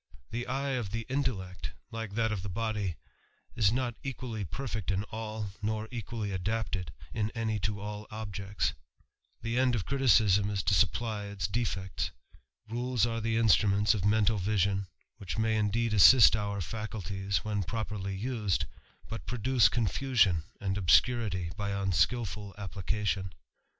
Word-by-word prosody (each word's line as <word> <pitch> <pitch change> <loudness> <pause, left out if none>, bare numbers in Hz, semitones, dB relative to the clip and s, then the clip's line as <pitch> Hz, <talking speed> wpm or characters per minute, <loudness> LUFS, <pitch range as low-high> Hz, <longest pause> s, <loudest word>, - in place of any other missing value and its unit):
The 120 +1 -3
eye 135 +2 -1
of 120 -6 -2
the 115 +3 -4
intellect, 95 -10 -2 0.2
like 115 -3 -5
that 110 0 +1
of 105 -4 -2
the 100 - -5
body, 105 -3 -2 0.6
is 105 -4 +4
not 125 0 0
equally 125 -6 -4
perfect 110 0 -4
in 95 0 +1
all, 110 -2 -4
nor 110 +1 -1
equally 110 -2 -4
adapted 95 -1 -2 0.2
in 110 -1 0
any 110 -2 -1
to 105 0 -2
all 105 +1 -6
objects; 100 -2 -3 0.7
the 115 +2 0
end 130 -1 +3
of 105 - -2
criticism 110 -7 +4
is 100 -2 -1
to - - +2
supply 105 +5 +1
its 100 -4 -3
defects; 95 -4 -2 0.6
tules 120 +1 +1
are 115 -1 -2
the 115 +1 0
instruments 105 -2 +4
of 105 -4 -2
mental 105 0 +3
vision, 100 0 +1 0.3
which 100 +1 -5
may 110 0 +2
indeed 110 +2 +1
assist 110 +3 +8
our 100 -2 -2
faculties 100 0 -3
when 105 -1 0
properly 100 -1 -3
used, 105 - 0 0.4
but 115 - -7
produce 125 0 +3
confusion 110 -5 +2 0.2
and 95 0 -1
obscurity 95 -2 +3
by 100 -1 -2
unskilful 100 +1 0
application. 100 -1 -2
105 Hz, 145 wpm, -30 LUFS, 100-115 Hz, 0.7 s, assist